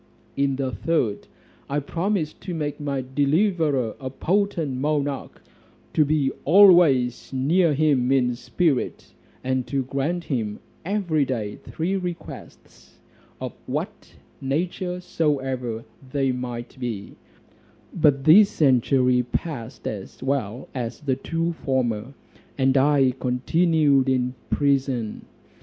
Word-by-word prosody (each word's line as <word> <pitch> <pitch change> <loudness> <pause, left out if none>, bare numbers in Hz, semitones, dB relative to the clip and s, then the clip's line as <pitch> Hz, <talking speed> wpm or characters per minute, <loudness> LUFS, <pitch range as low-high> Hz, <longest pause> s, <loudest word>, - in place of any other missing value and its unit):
In 140 -1 +1
the 130 -1 -2
third, 130 -12 -1 0.4
I 140 - -1
promised 165 +2 -2
to 180 - -5
make 150 -2 -3
my 140 -3 -2
deliverer 145 - +1
a 130 - -4
potent 165 -2 0
monarch, 145 -1 -2 0.5
to 155 - +4
be 145 -2 +1
always 165 - +5
near 150 +5 +2
him 135 -4 +2
in 125 -2 +3
spirit, 125 +4 -1 0.3
and 130 -1 -1
to 135 -2 -1
grant 140 +7 -2
him 110 -9 -2 0.3
every 175 -5 0
day 115 -6 -3
three 175 +5 -3
requests, 180 -2 -9 0.4
of - - -5
what - - -5 0.3
nature 180 +6 -2
soever 135 -9 -2 0.3
they 135 -2 +1
might 125 -1 -6
be: 115 -6 -5 0.8
but 145 -5 +3
this 195 +8 +7
century 125 -2 +3
passed 125 -2 -5
as 100 +4 -6
well 130 -3 -2
as 120 -2 -4
the 135 -3 0
two 165 +5 -2
former, 130 -4 -2 0.4
and 135 0 +2
I 135 -1 +4
continued 140 +1 +2
in 125 -1 +1 0.2
prison. 135 -6 0
135 Hz, 115 wpm, -24 LUFS, 125-160 Hz, 0.8 s, this